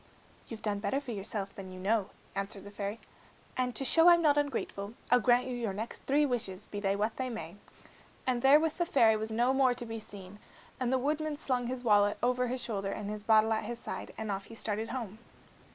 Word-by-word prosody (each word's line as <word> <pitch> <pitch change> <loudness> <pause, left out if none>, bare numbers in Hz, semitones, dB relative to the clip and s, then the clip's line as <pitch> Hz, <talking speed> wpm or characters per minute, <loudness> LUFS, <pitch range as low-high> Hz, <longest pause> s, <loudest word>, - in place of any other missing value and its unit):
"You've 225 -2 -8
done 205 -2 -1
better 270 +6 0
for 275 -4 -7
yourself 200 -1 -3
than 190 -1 -8
you 185 - -9
know," 200 +1 +1 0.2
answered 195 0 -4
the 200 - -10
fairy, 205 +2 -4 0.6
"and 250 -1 -1
to 270 - -1
show 330 +6 +7
I'm 340 -1 +6
not 295 -2 +5
ungrateful, 235 -7 -2 0.2
I'll 245 - +7
grant 245 +1 +4
you 255 -1 -3
your 230 -5 -2
next 220 +4 -5
three 290 +2 +4
wishes, 215 -7 -3
be 205 - -6
they 195 -1 +1
what 215 +2 -1
they 260 -1 -2
may." 175 -8 -6 0.7
And 250 -2 +1
therewith 300 +4 +5
the 345 - +2
fairy 225 -8 +5
was 215 +1 -3
no 240 +4 +2
more 265 -2 +3
to 240 - -4
be 225 0 -5
seen, 200 -1 -11 0.4
and 255 -1 0
the 260 - +3
woodman 300 +3 -1
slung 250 -4 -1
his 250 0 -4
wallet 205 -2 +4
over 250 0 +2
his 250 +1 -3
shoulder 200 -4 -2
and 205 +1 -4
his 210 0 -5
bottle 220 +1 +4
at 220 -1 -1
his 235 +2 -4
side, - - -6
and 220 -1 -3
off 195 0 -3
he 230 - -11
started 220 0 -2
home. 225 -5 -5
225 Hz, 225 wpm, -31 LUFS, 205-255 Hz, 0.7 s, show